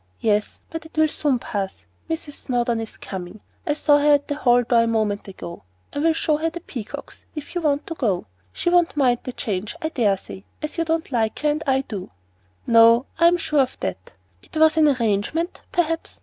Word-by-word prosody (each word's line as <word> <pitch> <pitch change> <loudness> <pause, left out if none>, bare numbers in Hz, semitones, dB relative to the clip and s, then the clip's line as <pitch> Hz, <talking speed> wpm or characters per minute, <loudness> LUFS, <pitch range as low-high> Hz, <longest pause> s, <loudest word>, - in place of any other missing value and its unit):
"Yes, 210 -1 0
but 325 -1 -5
it 320 - -22
will 315 0 +5
soon 290 -3 +1
pass. 200 -4 -4 0.2
Mrs. 320 -2 -4
Snowdon 240 -4 -1
is 225 - -8
coming. 190 +2 -7 0.3
I 295 - +3
saw 295 -1 +4
her 295 0 +6
at 285 - -2
the - - +1
hall 245 -4 +3
door 235 0 +4
a 230 - +2
moment 215 -3 0
ago. 170 -3 -8 0.3
I - - -2
will 325 +2 +3
show 310 -1 +1
her 325 +2 0
the 335 +2 -7
peacocks, 230 -8 -8
if 300 - -7
you 350 - -1
want 290 -2 +1
to - - -4
go. 210 - 0 0.3
She 345 - -1
won't 350 -3 +3
mind 250 -4 +3
the 255 - -3
change, 210 - -3
I 315 -2 -2
dare 215 -10 +2
say, 190 0 -11 0.2
as 305 +2 -4
you 330 - +1
don't 325 -2 -1
like 225 -3 0
her, 300 - +2
and 300 +1 0
I 265 0 +3
do." 205 -8 -7 0.6
"No, 230 +2 +6
I 335 - +7
am 350 +1 +4
sure 300 -3 0
of 260 -1 +1
that. 90 0 -4 0.3
It - - -9
was 315 0 +5
an 315 -1 +5
arrangement, 255 - 0
perhaps? 330 -1 -1
270 Hz, 215 wpm, -23 LUFS, 225-315 Hz, 0.6 s, I